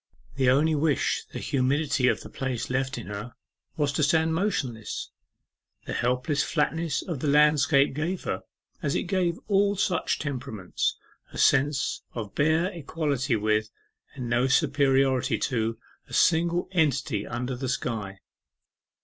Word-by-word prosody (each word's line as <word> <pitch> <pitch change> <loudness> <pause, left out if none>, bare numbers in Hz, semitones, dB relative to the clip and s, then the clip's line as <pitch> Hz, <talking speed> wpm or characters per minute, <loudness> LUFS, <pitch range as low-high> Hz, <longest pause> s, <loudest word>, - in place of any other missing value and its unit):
The 130 -2 +3
only 150 +5 +4
wish 150 -1 +1
the - - -6
humidity 140 0 +1
of - - +1
the - - -10
place 130 -2 -3
left 130 0 -1
in 120 - -6
her 105 +4 -7 0.4
was 145 -2 +1
to 140 - -1
stand 160 +2 +3
motionless. 135 - -2 0.7
The - - -4
helpless 125 +4 0
flatness 165 0 0
of 165 -7 -4
the 150 - -2
landscape 145 -1 +4
gave 165 +6 -2
her, - - -2 0.4
as 140 - -1
it - - 0
gives 180 -2 0
all 200 0 +3
such 180 -3 0
temperaments, 125 - -3 0.3
a - - -9
sense 140 +1 +2
of 110 -4 -5
bare 160 +5 +2
equality 145 - -1
with, 110 0 +1 0.5
and 125 -3 -5
no 120 +2 +2
superiority 135 -2 +2
to, 115 -3 -1 0.3
a - - -14
single 170 +1 +3
entity 140 - +1
under 125 +2 -3
the 130 +1 -4
sky. 105 -6 -3
140 Hz, 140 wpm, -26 LUFS, 125-160 Hz, 0.7 s, only